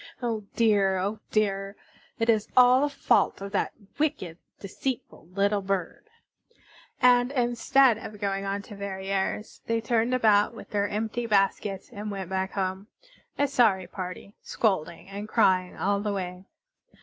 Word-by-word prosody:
Oh 225 -4 -3
dear! 205 -4 +3
oh 200 +4 -2
dear! 195 -2 0 0.4
It 225 - 0
is 220 -3 +2
all 250 +1 +7
the 290 - +2
fault 280 - +2
of 200 0 -7
that 200 - -1 0.3
wicked, 185 - -1 0.2
deceitful 215 -2 -5
little 200 +3 +1
bird." 190 - -3 0.9
And, 245 0 +5
instead 245 -1 +3
of 210 -1 -9
going 195 -1 -1
on 200 +1 -3
to 210 - -11
Verrières, 195 +1 -3
they 230 0 +1
turned 230 +2 +1
about 215 -2 +3
with 220 - -11
their 205 -1 +1
empty 220 +3 -2
baskets 195 -1 0
and 210 +1 -6
went 190 -2 -5
back 190 0 -2
home, 190 +1 -3 0.5
a 285 - +2
sorry 220 -9 +3
party, 185 +2 -7
scolding 185 -5 -1
and 200 +2 -7
crying 185 -5 +2
all 200 +1 +1
the 205 0 -2
way. 180 -1 -5
205 Hz, 150 wpm, -27 LUFS, 195-230 Hz, 0.9 s, all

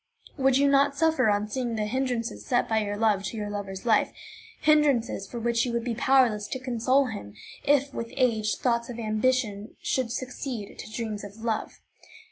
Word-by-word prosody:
Would 265 -2 +3
you 280 +1 +4
not 280 0 +4
suffer 315 -7 +3
on 205 0 +1
seeing 240 +1 -2
the 215 -1 -1
hindrances 245 0 -2
set 245 - +1
by 220 -1 +2
your 205 -1 -2
love 210 -3 +2
to 210 +4 -4
your 210 -1 -3
lover's 195 -1 -5
life, 220 -3 +3 0.5
hindrances 285 -9 +3
for 240 - -5
which 235 0 +1
you 245 - -1
would 235 -1 -1
be 240 -1 -2
powerless 235 -4 +3
to 260 - -4
console 255 +2 +2
him, 155 - -7 0.3
if, 285 -1 +3
with 230 0 -5
age, 220 -5 +2
thoughts 235 -1 0
of 240 - -6
ambition 215 -1 0
should 255 -3 -1
succeed 250 -3 -5
to - - -8
dreams 215 -2 -4
of 205 +1 -9
love? 225 -2 -2
235 Hz, 185 wpm, -27 LUFS, 215-260 Hz, 0.5 s, you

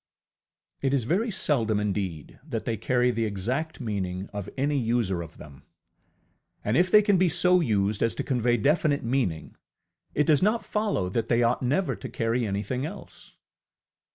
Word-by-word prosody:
ŌĆØ 140 - 0
It 135 - +1
is 130 - +1
very 195 - 0
seldom 115 - 0
indeed 95 -7 -3
that 125 -7 -5
they 115 - -1
carry 125 +2 +1
the 115 -1 -1
exact 120 +11 -3
meaning 100 -5 -4
of 100 -2 -5
any 145 +2 +1
user 115 -7 0
of 85 -1 -10
them! 70 -3 -13 1.0
And 105 - +1
if 180 +2 +3
they 210 +2 +6
can 200 -3 +3
be 185 -1 +4
so 180 +2 +4
used 105 - 0
as 115 - +1
to - - -3
convey 120 -2 +1
definite 145 +4 +1
meaning, 115 -10 -2 0.6
it 150 - +3
does 150 -2 +4
not 215 +4 +1
follow 210 - -1
that 115 +4 -2
they 120 0 +3
ought 120 +1 +1
never 145 +9 0
to - - -8
carry 115 -1 -1
anything 105 +6 -2
else. 175 +7 -9
120 Hz, 175 wpm, -26 LUFS, 105-150 Hz, 1.0 s, they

